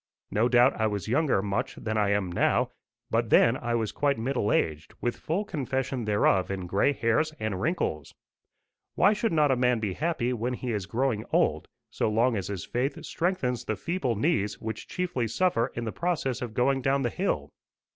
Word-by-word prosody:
No 115 +4 +2
doubt 120 -1 +4
I 110 - +3
was 105 -1 -3
younger 130 -4 +2
much 100 -1 -2
than 110 0 -4
I 105 -2 +2
am 100 -3 0
now, 85 - +2 0.4
but 115 0 +1
then 115 +3 +5
I 120 -2 -2
was 110 -3 -1
quite 140 -1 +1
middle 115 -2 0
aged, 75 -1 -1
with 120 - -1
full 185 +7 -2
confession 135 - -2
thereof 105 -3 +2
in 95 -2 -3
gray 100 +9 +2
hairs 140 +5 +1
and 110 -4 -2
wrinkles. 110 - -2 0.8
Why 205 - +5
should 215 +1 -1
not 150 -3 +3
a - - +4
man 125 -1 +2
be 105 -4 -2
happy 140 - -1
when 120 +1 -2
he 125 0 -4
is 100 -5 -3
growing 115 -1 0
old, - - +1 0.2
so - - 0
long 115 +3 +2
as 100 -3 -3
his 100 -3 -4
faith 130 +4 -2
strengthens 165 -9 -1
the 110 - -1
feeble 145 - -2
knees 105 - 0
which 110 -1 -5
chiefly 170 -10 -2
suffer 125 - +1
in 120 - -3
the 110 - -3
process 155 -8 -1
of 120 -3 -5
going 135 +2 +2
down 135 +2 +1
the 120 - 0
hill? - - -2
120 Hz, 195 wpm, -27 LUFS, 105-135 Hz, 0.8 s, then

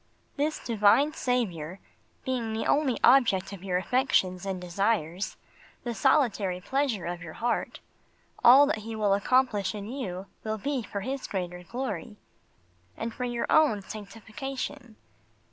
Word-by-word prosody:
This 300 +2 0
Divine 230 +7 +3
Saviour 190 - -2 0.5
being 245 -4 -2
the 220 - -2
only 285 -4 +2
object 230 -7 +4
of 190 -2 -9
your 185 -2 0
affections 190 -4 +1
and 190 -1 -2
desires, 180 0 -1 0.5
the 240 - -3
solitary 205 -5 +2
pleasure 250 - -1
of 175 0 -4
your 165 -2 -8
heart, 235 0 -2 0.6
all 265 +4 +9
that 285 -6 -1
He 225 +1 -6
will 210 -2 +2
accomplish 210 -1 +2
in 205 -1 -6
you 200 -7 -5 0.2
will 220 0 -2
be 275 +3 -2
for 205 -2 -5
His 265 +5 -4
greater 180 -2 -4
glory, 240 +2 -5 0.8
and 225 0 -4
for 250 - -3
your 240 -1 -2
own 275 -11 +4
sanctification. 225 +3 -7
220 Hz, 140 wpm, -28 LUFS, 195-255 Hz, 0.8 s, all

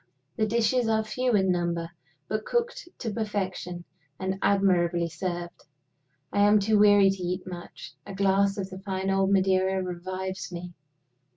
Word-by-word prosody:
The 215 - +1
dishes 235 +2 +2
are 220 0 +2
few 250 +3 -1
in 190 -2 +3
number, 170 -1 -1 0.4
but 215 0 -2
cooked 475 - -2
to 225 - -4
perfection 190 -5 -3 0.4
and 190 0 -2
admirably 175 -4 +2
served. 175 0 -5 0.7
I - - +1
am 205 +1 +6
too 210 +1 +2
weary 205 -2 +6
to 195 -1 -6
eat 180 +1 -3
much: 175 -4 -9
a 195 - -8
glass 195 +1 +2
of 195 -1 -4
the 185 - -7
fine 190 -1 -2
old 195 0 +2
Madeira 190 0 +2
revives 185 +1 -5
me. 175 0 -7
190 Hz, 155 wpm, -27 LUFS, 180-205 Hz, 0.7 s, am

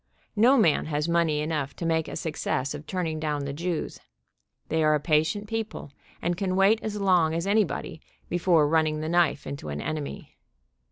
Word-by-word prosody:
No 240 +6 +5
man 165 - +3
has 150 0 -1
money 170 -3 +2
enough 150 -3 -2
to 170 - -5
make 160 -1 +1
a - - -6
success 150 -4 -2
of 145 +1 -8
turning 165 -4 -2
down 150 -2 -2
the 140 - -4
Jews. 170 +2 -3 0.7
They 160 0 +1
are 155 0 +4
a - - +1
patient 160 +7 +1
people, 225 -9 -4 0.3
and 175 0 0
can 185 0 -1
wait 200 +4 +4
as 210 -1 -4
long 180 -5 +3
as 170 +2 -2
any 210 +2 +4
body 160 -1 -6 0.3
before 170 -3 +3
running 155 0 +1
the 155 - -3
knife 170 -4 +2
into 140 - -6
an 75 0 -4
enemy. 155 - -5
160 Hz, 185 wpm, -26 LUFS, 150-180 Hz, 0.7 s, No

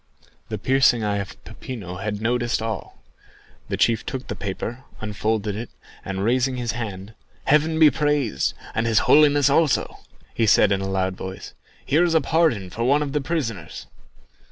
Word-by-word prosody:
The - - -3
piercing 130 -3 +3
eye 105 -1 0
of 100 -1 -6
Peppino 100 -8 -7
had 105 +2 -4
noticed 120 +1 0
all. 110 -1 -5 0.7
The - - -2
chief 115 -2 +2
took 130 0 -5
the - - -3
paper, 115 +5 -5 0.2
unfolded 105 0 -2
it, 115 +3 -6 0.3
and, 95 0 -3
raising 125 +3 +1
his 120 -1 -2
hand, 105 -3 -6 0.3
"Heaven 155 +2 +3
be 155 -2 +7
praised, 145 - 0 0.2
and 110 +1 0
his 110 -2 +3
Holiness 145 -1 +5
also," 145 0 +2 0.4
said 105 -1 +5
he - - +5
in 95 - -1
a 95 - -3
loud 95 -1 -1
voice; 95 +1 -8 0.3
"here 155 +5 +3
is 170 -2 +1
a - - +6
pardon 140 - +1
for 115 - -3
one 140 +4 +3
of 140 - -4
the 150 +1 0
prisoners!" 115 - -4
115 Hz, 170 wpm, -23 LUFS, 100-140 Hz, 0.7 s, be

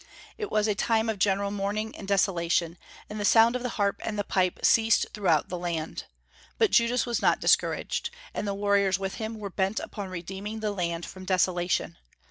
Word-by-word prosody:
It 425 -2 -5
was 215 0 +1
a 210 - +2
time 225 +2 +1
of 210 - -7
general 200 +1 +1
mourning 205 +2 -3
and 195 - -9
desolation, 175 -3 +1 0.3
and 210 - -6
the - - -2
sound 225 +3 +5
of 250 - -2
the 250 - -2
harp 200 -1 0
and 215 -2 -3
the 205 - 0
pipe 185 -2 0
ceased 225 -1 +4
throughout 175 -8 +1
the 180 - -4
land. 170 -2 -4 0.5
But 445 -4 +3
Judas 235 +1 +3
was 240 -1 -1
not - - +3
discouraged; - - +1 0.2
and 210 - -3
the 200 - -1
warriors 200 -2 +2
with 195 0 -4
him 220 +1 -4
were 205 -2 -6
bent 195 +3 0
upon 200 -2 -6
redeeming 195 +5 -6
the 215 -1 -1
land 170 -3 -2
from 185 0 -10
desolation. 180 - 0
200 Hz, 195 wpm, -27 LUFS, 185-220 Hz, 0.5 s, sound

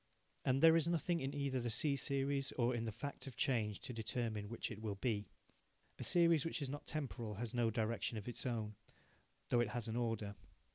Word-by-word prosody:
And 135 +2 +2
there 165 0 +9
is 165 -1 +3
nothing 170 0 +1
either 140 0 -1
in - - -3
the 120 - 0
C 140 +5 +2
series 140 0 0
or 120 0 +2
in 115 -1 -1
the 110 - -2
fact 140 +5 -5
of 130 - -7
change 110 -7 +1
to 130 - -6
determine 110 -2 -2
which 115 - -3
it 110 -1 -7
will 105 -2 -2
be. 105 0 -1 0.7
A - - -3
series 170 -4 +5
which 165 - -2
is 140 -3 -2
not 145 +2 -6
temporal 125 -8 -3
has 115 +2 -4
no 120 -2 +3
direction 110 +1 -1
of 105 - -6
its 120 - -1
own, 110 -3 -2 0.8
though 120 - +4
it 120 - +2
has 120 -2 -2
an 110 - -2
order. 115 -4 -1
120 Hz, 210 wpm, -39 LUFS, 110-140 Hz, 0.8 s, there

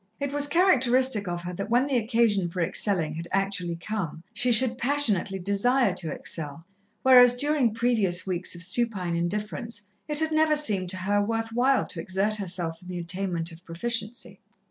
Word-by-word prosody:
It 280 -1 -3
was 290 0 +2
characteristic 260 - +3
of 175 0 -4
her 180 0 -5
that 195 +4 -5
when 245 +3 +3
the 280 -2 -2
occasion 225 -5 +1
for 180 - -6
excelling 170 -2 0
had 165 +2 -6
actually 190 -3 0
come, 170 -3 -5
she 250 0 0
should 240 +1 +2
passionately 235 -8 +1
desire 200 +4 +1
to 170 -3 -3
excel, 160 0 -3 0.4
whereas 250 -2 +7
during 280 -2 +2
previous 220 -6 0
weeks 180 -1 -2
of 170 - -4
supine 185 -3 -1
indifference, 210 +5 -2 0.2
it 300 -1 -2
had 315 +1 0
never 310 0 +3
seemed 205 -12 +1
to 185 - -2
her 205 +2 0
worth 225 +2 -2
while 255 +3 +2
to 175 - -7
exert 195 +5 0
herself 175 -4 -4
in 180 - -14
the 180 -1 -5
attainment 175 -1 -3
of 165 +2 -13
proficiency. 225 +6 -4
205 Hz, 175 wpm, -26 LUFS, 180-245 Hz, 0.4 s, whereas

